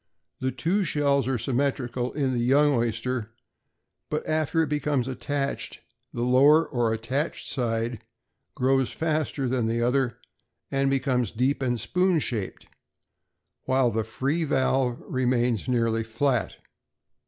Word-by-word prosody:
The 130 0 -1
two 190 +8 0
shells 140 -5 +1
are 130 -1 0
symmetrical 125 0 -1
in 135 -3 0
the 120 - 0
young 140 +5 +4
oyster; 120 -1 -1 0.8
but 150 - -2
after 155 +1 +1
it - - -2
becomes 145 -3 0
attached, 140 +2 -3 0.3
the 120 - -3
lower 140 +6 +5
or 120 -4 0
attached 130 +8 -2
side 115 -2 -2 0.5
grows 135 0 +2
faster 155 -4 -1
than 125 -2 0
the 115 +1 0
other, 125 0 +1 0.5
and 135 0 +1
becomes 130 -4 0
deep 130 +5 0
and 120 -2 0
spoon 180 +4 +2
shaped, 115 -9 -3 1.0
while 130 -2 +2
the 110 0 -1
free 135 +9 -1
valve 130 -4 +1
remains 125 -3 0
nearly 115 -2 +1
flat. 115 +1 -1
130 Hz, 130 wpm, -26 LUFS, 120-140 Hz, 1.0 s, lower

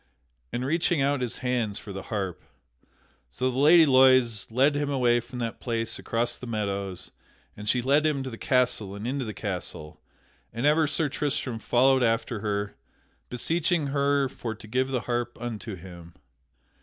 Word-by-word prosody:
and 125 +1 -2
reaching 165 +2 +1
out 140 0 +1
his 125 -1 -3
hands 120 -5 0
for 100 - -8
the 95 - -5
harp. 95 -6 -3 0.9
So 130 - -1
the 125 - -5
Lady 160 +3 +7
Loise 130 -5 +4
led 135 +6 +3
him 145 0 -1
away 125 -3 +3
from 125 +2 -9
that 115 -2 -4
place 115 -2 -2
across 115 +1 -1
the 125 - -8
meadows; 100 -4 -3 0.4
and 105 0 -5
she 125 0 +2
led 140 +4 +3
him 150 -3 0
to 130 - -6
the - - -6
castle 125 -6 +1
and 100 +2 -7
into 130 +1 -2
the 110 - -4
castle; 90 -6 -5 0.5
and 115 +4 -3
ever 155 +1 +4
Sir 155 +1 0
Tristram 135 -4 -2
followed 130 +3 +3
after 115 -1 0
her, 100 -1 -2 0.6
beseeching 160 +4 0
her 140 -1 +2
for 115 -3 -6
to 110 - -13
give 130 +4 0
the 130 -2 -1
harp 120 0 -3
unto 115 -3 -5
him. 85 -2 -12
125 Hz, 170 wpm, -26 LUFS, 110-140 Hz, 0.9 s, Lady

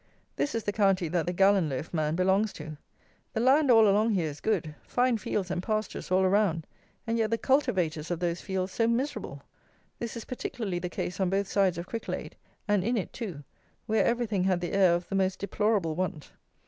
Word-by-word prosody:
This 285 - -1
is 225 - -1
the 205 - -1
county 195 -4 +2
that 170 0 0
the - - +1
Gallon 190 -2 +3
loaf 135 +5 -5
man 155 -1 0
belongs 190 +4 +2
to. 155 0 -8 0.6
The - - -1
land 270 +4 +4
all 225 -3 +7
along 210 +2 +3
here 165 -5 0
is 145 - -11
good. 175 -8 0
Fine 245 -2 +2
fields 190 -2 -2
and 180 - -1
pastures 215 +2 -3
all 185 +1 +3
around; 185 -4 +2 0.4
and 230 0 0
yet 220 -1 +1
the 230 - +1
cultivators 180 - +1
of 175 -2 -2
those 175 -1 -1
fields 190 -1 -2
so 230 - +2
miserable! 250 +5 -2 0.6
This 235 0 -4
is 230 - -7
particularly 225 -7 -4
the 180 0 -4
case 180 - -4
on 190 -2 +2
both 195 +1 0
sides 195 -4 +2
of 170 - -4
Cricklade, 230 - -5 0.3
and 205 -3 +2
in 235 +4 0
it 195 - -3
too, 185 - -6 0.4
where 220 0 +2
everything 225 -6 0
had 185 -2 +2
the 175 - -4
air 190 -3 +5
of 175 +1 -4
the - - -7
most 190 -1 +1
deplorable 200 -4 0
want. 170 -3 -4
195 Hz, 205 wpm, -28 LUFS, 175-220 Hz, 0.6 s, all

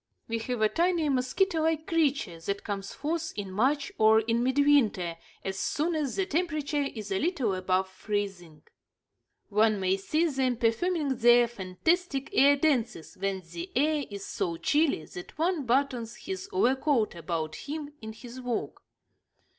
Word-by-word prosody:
We 230 0 -2
have 230 0 -2
a - - +6
tiny, 335 +3 +1
mosquito 315 +7 +1
like 320 0 0
creature 280 - 0
that 200 +5 -3
comes 195 -2 -4
forth 325 +2 -3
in 200 -2 -5
March 270 +8 +1
or 220 0 +6
in 230 +1 0
midwinter, 255 -10 +3 0.3
as 190 0 -3
soon 310 - 0
as 300 -5 -1
the 390 - +1
temperature 305 -4 -1
is 210 -2 -6
a 190 - +1
little 295 - 0
above 185 0 0
freezing. 190 -4 -4 0.9
One 215 0 +3
may 190 0 +1
see 305 - 0
them 265 -5 0
performing 275 +5 +1
their 240 +1 +6
fantastic 270 - -1
air 285 -4 +6
dances 255 - 0
when 195 0 -2
the 175 +1 -6
air 295 +2 +2
is 200 -1 -7
so 170 -2 -2
chilly 285 - +1
that 180 - -10
one 325 -4 0
buttons 245 -2 0
his 380 +5 -6
overcoat 265 - +2
about 160 -2 -3
him 295 0 -6
in 220 0 -7
his 240 +3 -10
walk. 245 -2 -3
245 Hz, 155 wpm, -28 LUFS, 200-300 Hz, 0.9 s, a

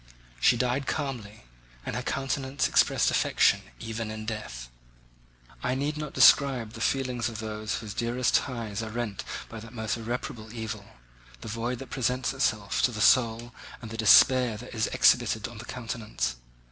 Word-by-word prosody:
She 120 - +4
died 125 +3 0
calmly, 120 -8 -4 0.4
and - - -4
her - - -2
countenance 135 0 -1
expressed - - +3
affection - - +3 0.2
even 115 -1 -4
in 110 0 -6
death. 105 - -6 0.9
I 125 0 0
need 145 +3 -1
not 150 -1 -5
describe 130 -6 +5
the 115 - -8
feelings 125 -3 0
of 115 - -7
those 110 0 -4
whose 110 -3 -6
dearest 120 +3 0
ties 115 -5 -1
are 110 - -5
rent 110 -3 -4 0.2
by 115 - -8
that 115 +1 -11
most 110 -1 -2
irreparable 115 -1 -5
evil, 110 -3 -5 0.6
the - - -8
void 115 +3 -2
that 135 0 -10
presents 130 0 0
itself 110 -7 0
to 125 - +3
the 110 - -6
soul, 120 0 +3 0.3
and 115 -3 -9
the - - -5
despair 115 +1 +6
that 125 +4 -10
is 110 -2 0
exhibited 110 -2 +3
on 120 -3 -11
the 115 - -8
countenance. 110 - -4
115 Hz, 165 wpm, -27 LUFS, 110-125 Hz, 0.9 s, despair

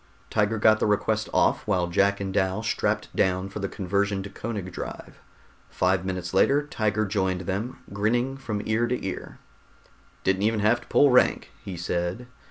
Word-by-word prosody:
Tiger 105 +1 +1
got 110 0 +5
the - - +1
request 110 +1 0
off - - +2
while 90 -4 +2
Jack 100 +3 +2
and 95 -1 -3
Dal 95 +2 0
strapped - - -1
down 95 +1 +1
for 105 - -6
the 100 -1 -2
conversion 100 0 -1
to 100 - -8
Koenig 100 -3 -5
drive. - - -8 0.5
Five 90 0 +1
minutes 90 -1 -4
later 140 +9 +3
Tiger 110 -6 0
joined 95 -2 -1
them, 105 +8 -4
grinning 120 +6 0
from 110 -6 -4
ear 115 +2 +1
to 125 -3 -2
ear. 95 - -5 0.9
"Didn't 95 0 +1
even 110 0 +1
have 115 +4 +3
to - - -17
pull 145 -2 +5
rank," 125 - +3
he 95 -3 -6
said. 85 +6 -2
100 Hz, 175 wpm, -26 LUFS, 95-110 Hz, 0.9 s, got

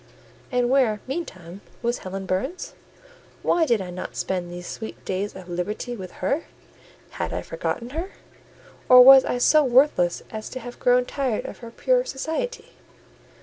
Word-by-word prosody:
And 250 -1 +2
where, 245 -5 +2
meantime, 195 - -6 0.2
was 235 +1 0
Helen 190 +1 -6
Burns? 205 - -3 0.7
Why 330 -2 +2
did 230 -6 +2
I 180 - -7
not 180 +1 -7
spend 180 -2 -3
these 175 0 -8
sweet 220 +4 -8
days 195 +2 -3
of 185 -1 -10
liberty 205 +7 -4
with 185 -4 -8
her? 280 - 0 0.7
Had - - -4
I - - -3
forgotten 240 +1 -4
her? 330 +6 -4 0.8
or 250 0 +10
was 265 0 +10
I - - -1
so 305 +5 +5
worthless 250 -9 +3
as 215 -1 -6
to 255 - -6
have 245 0 -9
grown 250 0 +3
tired 260 -5 -2
of - - -8
her 235 - -9
pure - - +1
society? 320 - -4
240 Hz, 160 wpm, -24 LUFS, 190-270 Hz, 0.8 s, or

